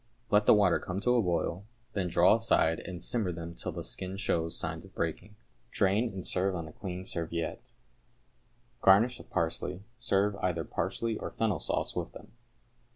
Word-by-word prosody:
Let 105 0 +4
the - - +9
water 100 -4 +4
come 95 +1 -4
to 125 +2 +3
a 120 - +4
boil, 90 0 -1 0.3
then 95 -3 0
draw 90 +4 +5
aside 80 -7 +2
and 90 -2 -7
simmer 110 -7 0
them 85 0 -6
till 90 - -3
the 85 0 -5
skin 95 +2 -3
shows 85 -5 0
signs 80 0 -3
of 95 - -14
breaking. 85 +6 -3 0.3
Drain, 105 +4 +2
and 95 -2 -6
serve 95 +1 0
on 85 -2 -4
a 75 - -11
clean 90 -2 -6
serviette. 85 -1 -3 1.1
Garnish 115 +6 +5
with - - -13
parsley. 85 +3 -2 0.2
Serve 105 -3 +2
either 90 -3 -1
parsley 105 +8 -2
or - - -4
fennel 110 -4 0
sauce - - -1
with - - -3
them. - - -12
95 Hz, 175 wpm, -30 LUFS, 85-105 Hz, 1.1 s, the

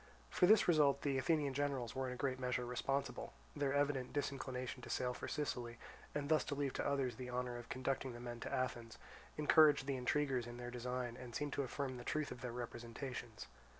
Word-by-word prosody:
For 180 - +5
this 215 +2 +7
result 145 -5 +5
the 140 -2 +2
Athenian 145 -2 +2
generals 135 -4 -1
were 130 0 -1
in 125 - -3
a - - -7
great 130 -1 -1
measure 125 -1 0
responsible; 135 +3 -2 0.2
their 145 -2 +1
evident 140 -2 +1
disinclination 130 -3 -2
to - - -9
sail 125 -1 0
for - - -5
Sicily, 120 -5 -2 0.4
and 145 -1 -1
thus 155 0 +4
to 145 - -2
leave 140 -2 0
to - - -1
others 135 -5 0
the 125 -1 -5
honour 125 0 -2
of 120 -1 -8
conducting 130 0 -1
the 120 - -8
men 120 -1 -5
to - - -5
Athens, 120 -4 -2 0.4
encouraged 150 -2 +6
the 135 -1 -1
intriguers 130 -2 +1
in 120 0 -7
their 120 0 -5
design 125 0 -3
and 125 -2 -8
seemed 145 -1 -1
to - - +1
affirm 130 -1 -3
the 120 - -7
truth 155 +3 -1
of 120 - -7
their 125 -2 -3
representations. 120 -1 -5
130 Hz, 210 wpm, -39 LUFS, 125-140 Hz, 0.4 s, this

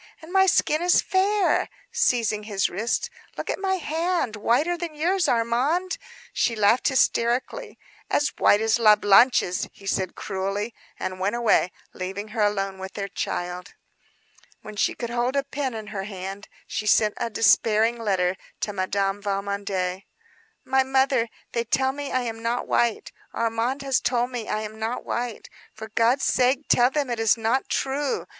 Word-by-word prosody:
And 325 +3 -12
my 385 0 +5
skin 310 -3 +2
is 355 0 +4
fair," 395 +1 +1 0.2
seizing 230 - +1
his 205 -2 -1
wrist. 230 - -2 0.3
"Look - - -3
at - - -4
my 385 -1 0
hand; 330 - -1
whiter 245 +11 +1
than 335 -2 -6
yours, 355 +4 +1
Armand," 255 +11 +1 0.3
she 235 - +1
laughed 215 +3 +3
hysterically. 260 - 0 0.3
"As 290 - +2
white 205 - +5
as 225 +1 +2
La 215 -2 +7
Blanche's," 205 -2 +4
he 200 - -17
returned 190 -2 -1
cruelly; 195 +3 -3 0.3
and 185 0 -4
went 200 +4 0
away 230 -6 +2 0.2
leaving 195 +3 -5
her 220 0 -3
alone 195 -2 -1
with 190 0 -7
their 200 -1 -4
child. 180 0 -4 0.9
When 215 - -9
she - - +1
could 235 -1 -5
hold 240 +2 0
a 280 - +2
pen 275 -3 -3
in 220 -1 -6
her 195 -1 -3
hand, 195 0 -7 0.2
she 215 - -4
sent 210 0 +4
a 235 - -2
despairing 225 +1 +3
letter 190 -4 0 0.2
to 205 - -2
Madame 195 +1 -1
Valmondé. 200 -2 -2 0.6
"My 265 0 +3
mother, 265 -3 +2 0.2
they 235 - -1
tell 265 +3 +1
me 285 +1 -6
I 255 - +1
am 225 -2 -5
not 235 +1 -2
white. 235 -2 0 0.2
Armand 230 +4 -1
has 270 -2 +1
told 245 0 0
me 240 -3 -5
I 215 - -1
am 215 0 -7
not 225 +3 -3
white. 240 -2 -4 0.3
For 220 0 -8
God's 230 +5 +2
sake 260 +3 +2
tell 245 +1 +5
them 280 -2 -1
it 235 - -2
is 225 0 +3
not 230 +4 0
true. 275 +1 -1
230 Hz, 165 wpm, -24 LUFS, 205-265 Hz, 0.9 s, La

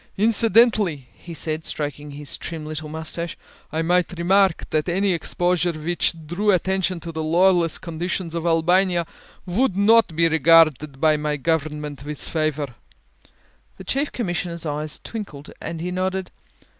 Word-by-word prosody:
Incidentally," 215 - +3
he 175 - -12
said, 155 +1 -2
stroking 145 -1 -4
his 145 0 -4
trim 160 -2 -7
little 155 0 -5
moustache, 160 +2 -3 0.3
"I 160 +1 -1
might 180 +1 +1
remark 190 +1 +2
that 155 +2 0
any 190 +2 +1
exposure 175 +1 0
which 165 +2 0
drew 185 +7 -1
attention 190 -1 +1
to 165 - -6
the 160 -1 -4
lawless 170 +1 +3
conditions 170 0 -4
of 170 0 -2
Albania 175 +2 +2 0.4
would 195 +2 0
not 220 -3 +4
be 165 +1 +4
regarded 155 -3 +4
by 155 0 +3
my 150 0 -2
government 150 -1 -2
with 150 +1 -3
favour." 155 -4 -1 1.0
The - - -9
Chief 275 +9 -1
Commissioner's 175 -6 -3
eyes 150 0 -2
twinkled 175 -11 -7
and 165 - -5
he 180 +1 -3
nodded. 185 0 -2
170 Hz, 145 wpm, -22 LUFS, 155-185 Hz, 1.0 s, not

